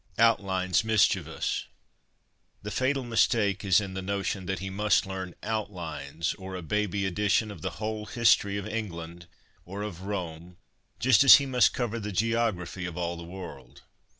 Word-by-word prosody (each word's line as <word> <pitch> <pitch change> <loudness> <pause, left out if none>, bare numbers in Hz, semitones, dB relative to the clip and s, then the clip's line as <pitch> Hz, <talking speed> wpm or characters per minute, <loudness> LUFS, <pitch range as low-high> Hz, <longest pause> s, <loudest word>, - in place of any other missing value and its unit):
'Outlines' 95 -5 +2
Mischievous. 110 -3 +1 1.0
The 105 - -5
fatal 130 +4 0
mistake 110 -4 +2
is 95 -2 +5
in 100 -2 -5
the 95 - -4
notion 100 -1 -3
that 95 - -1
he 95 +1 -5
must 105 +2 +2
learn 95 -2 -6
' - - -40
outlines/ 85 -6 -4
or 95 0 -7
a 90 - -6
baby 100 +2 -1
edition 105 +3 +1
of 100 - -10
the 95 - -2
whole 110 +1 -4
history 105 -4 +3
of 100 - -4
England, 85 -6 -6 0.4
or 100 +3 -6
of 95 -5 -6
Rome, 90 -3 -5 0.4
just 130 0 +5
as 135 - +11
he 140 - +2
must 125 -3 +3
cover 115 -2 -2
the 105 -1 -5
geography 100 -4 -1
of 90 0 -7
all 85 -1 -2
the 85 - -8
world. 90 +2 -10
100 Hz, 165 wpm, -28 LUFS, 90-110 Hz, 1.0 s, as